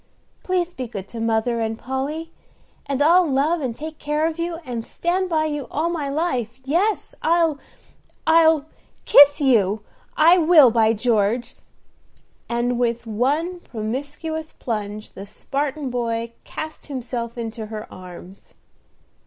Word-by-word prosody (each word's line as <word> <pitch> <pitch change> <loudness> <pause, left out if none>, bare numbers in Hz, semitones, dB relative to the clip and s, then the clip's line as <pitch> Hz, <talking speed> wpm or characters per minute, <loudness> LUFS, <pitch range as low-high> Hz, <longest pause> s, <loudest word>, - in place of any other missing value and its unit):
Please 360 -1 -1
be 255 -7 -5
good 200 -4 -7
to 235 - -7
Mother 225 +1 0
and 225 0 -2
Polly, 285 +7 -4 0.6
and 280 0 +1
I'll 345 +3 +5
love 295 +5 +1
and 250 -4 -3
take 310 +2 -8
care 300 +1 0
of 325 0 -2
you, 340 0 -2
and 235 -3 -4
stand 365 +8 -1
by 315 -2 +1
you 295 -3 -3
all 320 +3 -1
my 310 -5 -2
life. 260 -6 -2
Yes, 360 +10 0
I'll 330 -3 +2 0.7
I'll 320 -2 +5 0.4
kiss 285 +1 +8
you, 220 -7 +3 0.4
I 335 +4 +6
will, 310 -6 +7
by 225 -1 +3
George!" 230 +1 0 0.9
And 240 +1 0
with 235 -1 0
one 285 +11 0
promiscuous 290 +7 -5
plunge 210 -2 -5
the 195 +1 -9
Spartan 280 +5 -3
boy 235 -1 -2
cast 315 0 -7
himself 245 -3 -5
into 225 -1 -5
her 215 0 -6
arms. 185 +1 -12
265 Hz, 135 wpm, -22 LUFS, 230-315 Hz, 0.9 s, kiss